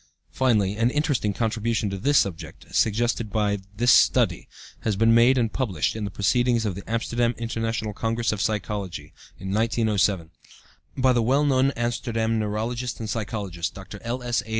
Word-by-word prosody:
Finally, 105 -6 +1
an 115 +2 +3
interesting 145 -6 0
contribution 110 +1 -1
to 100 - -3
this 140 +6 +3
subject, 95 -7 -2
suggested 115 0 +1
by 105 -1 0 0.2
this 120 +2 +4
Study, - - +3 0.3
has 110 -2 -1
been 115 +3 +4
made 120 +3 +5
and 115 -3 0
published 100 - -1
(in 110 -2 -3
the - - -3
proceedings 120 +4 +1
of 100 - -1
the 100 - -7
Amsterdam 120 +1 0
International 115 -2 -3
Congress 115 +2 -1
of 105 -2 -3
Psychology, 105 -4 -3 0.2
in 95 0 -6
1907) 105 -6 +1 0.7
by 130 -1 +4
the 120 - +2
well 135 +6 +2
known 135 -1 +3
Amsterdam 115 -1 -1
neurologist 115 +4 -3
and 110 - -4
psychologist, 100 -6 -4
Dr. 100 +1 -9
L.S.A. 120 -1 -2
115 Hz, 155 wpm, -24 LUFS, 105-120 Hz, 0.7 s, made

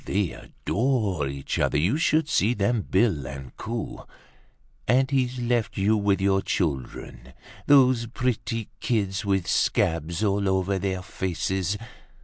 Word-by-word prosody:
They 95 -2 0
adore 105 - -1
each 70 0 -4
other. - - +2
You 85 - +2
should 160 0 +2
just 150 - -2
see 115 +5 +3
them 110 +3 +1
bill 95 - +1
and 70 -2 -8
coo! 115 0 -5 0.9
And 130 +3 +3
he's 130 -2 +1
left 120 -2 -1
you 100 +3 +3
with 100 -2 +2
your 95 0 +2
children. 65 -6 -3 0.3
Those 130 -4 +5
pretty 115 -2 -2
kids 100 -4 -1
with 95 -3 +1
scabs 85 +3 +1
all 100 -1 +1
over 95 +1 +1
their 95 -1 -2
faces! 95 +1 -2
100 Hz, 135 wpm, -25 LUFS, 90-120 Hz, 0.9 s, Those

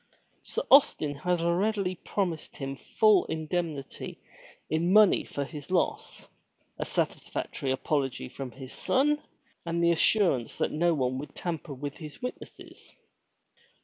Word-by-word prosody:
Sir - - -3
Austin 160 - +6
had 175 +4 -1
readily 185 +3 +1
promised 180 -2 -3
him 135 -1 -4
full 210 +6 +3
indemnity 160 -2 -4 0.5
in 165 +3 +1
money 210 0 +6
for 140 - -4
his 150 +1 -9
loss, 185 -1 -1 0.5
a - - -1
satisfactory 135 - -2
apology 135 - -1
from 135 - -6
his 130 +2 -10
son 295 +3 +2 0.4
and 170 0 -1
the 170 - +5
assurance 170 - +2
that - - 0
no 170 +2 +2
one 130 -2 0
would 145 - -8
tamper 165 -4 -4
with 140 +2 -6
his 155 -3 -9
witnesses. 250 0 -9
165 Hz, 130 wpm, -28 LUFS, 140-185 Hz, 0.5 s, Austin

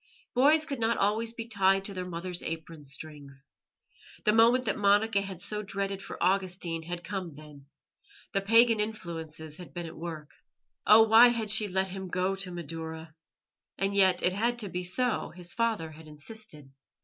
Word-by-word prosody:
Boys 300 +5 +5
could 275 -5 -4
not 230 0 +1
always 220 +3 +1
be 230 -1 -6
tied 195 -3 +2
to 200 - -3
their 185 -1 -5
mother's 175 +1 -4
apron 160 -1 -6
strings. 140 -1 -6 0.7
The 210 - +4
moment 235 +3 +5
that 205 - 0
Monica 205 0 +3
had 190 -3 -7
so 210 0 -3
dreaded 195 -1 -3
for - - -8
Augustine 180 -3 0
had 175 +1 -6
come 185 -6 -5
then; 145 -2 -14 0.7
the 195 - +1
pagan 230 +2 +5
influences 165 -7 -5
had 180 0 -12
been 175 -1 -4
at 165 - -9
work. 160 -3 -7 0.6
Oh, 220 +1 +9
why 225 +2 +8
had 230 -3 +1
she 215 -1 +3
let 190 0 0
him 190 0 -6
go 185 +2 0
to 195 -1 -2
Madaura? 160 -1 -7 0.6
And 195 +1 0
yet 190 -2 +4
it 180 - +3
had 235 +5 0
to 210 -4 -4
be 180 0 -3
so; 245 +7 0
his 175 -1 -7
father 225 -9 -1
had 155 +1 -13
insisted. 150 -1 -9
190 Hz, 175 wpm, -29 LUFS, 165-215 Hz, 0.7 s, Oh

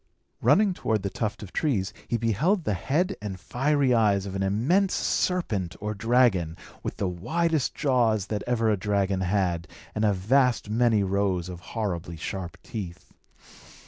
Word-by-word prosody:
Running 205 -2 +4
toward 110 - -1
the 100 - -2
tuft 105 -1 -3
of 95 - -10
trees, 110 -10 0
he 120 - 0
beheld 130 - +1
the 105 - 0
head 160 - 0
and 100 -3 -5
fiery 135 - +1
eyes 105 -4 +3
of 95 - -5
an 95 - -2
immense 130 - +2
serpent 110 - 0
or 105 +1 -3
dragon, 105 -7 +2 0.2
with - - -5
the 100 - 0
widest 155 - 0
jaws 120 - +2
that 105 -1 -3
ever 115 -2 +2
a 105 - +1
dragon 100 -1 0
had, 90 -2 0 0.3
and 105 - -1
a 105 - +4
vast 120 +3 +2
many 115 -2 +3
rows 95 -2 0
of 90 -2 -7
horribly 90 -4 -4
sharp 85 +2 -5
teeth. 95 -5 -7
105 Hz, 160 wpm, -26 LUFS, 95-125 Hz, 0.3 s, Running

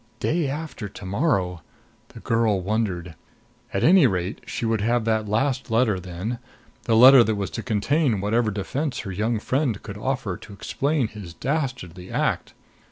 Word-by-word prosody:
Day 160 -3 0
after 145 -7 -5
to 95 - -10
morrow! 95 - 0 0.5
The - - -13
girl 115 -3 +1
wondered. 95 -4 -2 0.6
At 100 - -1
any 175 -4 +7
rate, 95 -1 -2
she - - -3
would 110 -2 +1
have 115 +1 +1
that 110 -2 0
last 130 +4 0
letter 115 -4 +2
then 90 +7 -5 0.5
the 115 - +2
letter 130 +1 +9
that 110 -1 0
was 100 -2 -3
to - - -4
contain 125 +2 +1
whatever 110 +3 +1
defense 125 +7 -3
her 95 - -6
young 110 +5 0
friend 125 -1 -1
could 100 -2 -7
offer 125 -6 -2
to 105 - -12
explain 140 +6 -1
his 100 -6 -10
dastardly 125 - -3
act. - - -1
110 Hz, 165 wpm, -24 LUFS, 100-130 Hz, 0.6 s, letter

